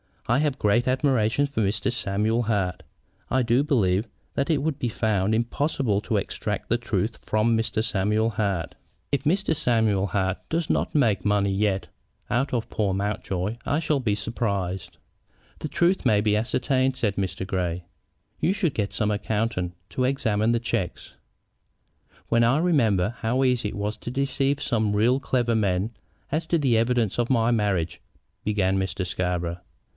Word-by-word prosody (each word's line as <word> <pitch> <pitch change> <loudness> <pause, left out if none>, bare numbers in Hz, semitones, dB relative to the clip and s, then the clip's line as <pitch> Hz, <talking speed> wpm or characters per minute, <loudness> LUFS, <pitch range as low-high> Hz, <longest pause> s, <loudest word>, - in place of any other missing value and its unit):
"I 120 +4 +2
have 145 -3 0
great 120 +3 +2
admiration 130 -1 +2
for 140 -5 -2
Mr. 100 +4 0
Samuel 110 0 0
Hart. 100 -6 -1 0.5
I 130 0 +2
do 120 +4 +3
believe 110 - +2 0.3
that 140 +2 -1
it 150 -4 +2
would 155 -2 -1
be 125 - 0
found 110 -2 +1
impossible 120 -2 0
to - - -2
extract - - -3
the - - +3
truth - - -2
from 110 +2 +2
Mr. 110 -1 0
Samuel 110 +1 +1
Hart. 100 -6 -1 0.4
If 140 -2 0
Mr. 185 +3 +2
Samuel 110 -8 +2
Hart 95 0 -1
does 165 0 -1
not - - 0
make 115 -10 +2
money 100 -1 +2
yet 95 -1 0 0.4
out 135 +5 +1
of 120 -2 -1
poor 100 -3 0
Mountjoy 100 0 -2
I 145 - +1
shall 155 -3 +1
be 110 -6 0
surprised." 100 -5 -3 0.6
"The - - -3
truth 175 +5 +2
may 105 -1 +4
be 105 0 +2
ascertained," 130 +3 +1
said 110 -6 -1
Mr. 95 -1 -2
Grey. 90 -2 -2 0.6
"You 185 - +2
should 185 -8 0
get 100 -2 -2
some 105 -2 0
accountant 105 -3 -1
to 130 - 0
examine 115 -4 +1
the 120 - 0
checks." 115 -6 -3 1.2
"When 115 0 +4
I 120 +4 +3
remember 115 - +2
how 125 +3 +1
easy 125 -4 +2
it - - -8
was 105 +1 -3
to - - -7
deceive 135 +2 0
some 110 -4 +1
really 120 +5 +3
clever 120 -3 0
men 100 0 +1 0.4
as 160 +3 -1
to 170 - +2
the 130 -7 +2
evidence 115 -2 +1
of 120 - +1
my 120 -2 +3
marriage 95 -7 0 0.2
" - - -48
began 95 -2 +1
Mr. 95 0 -2
Scarborough. 90 -1 -2
110 Hz, 165 wpm, -25 LUFS, 100-130 Hz, 1.2 s, may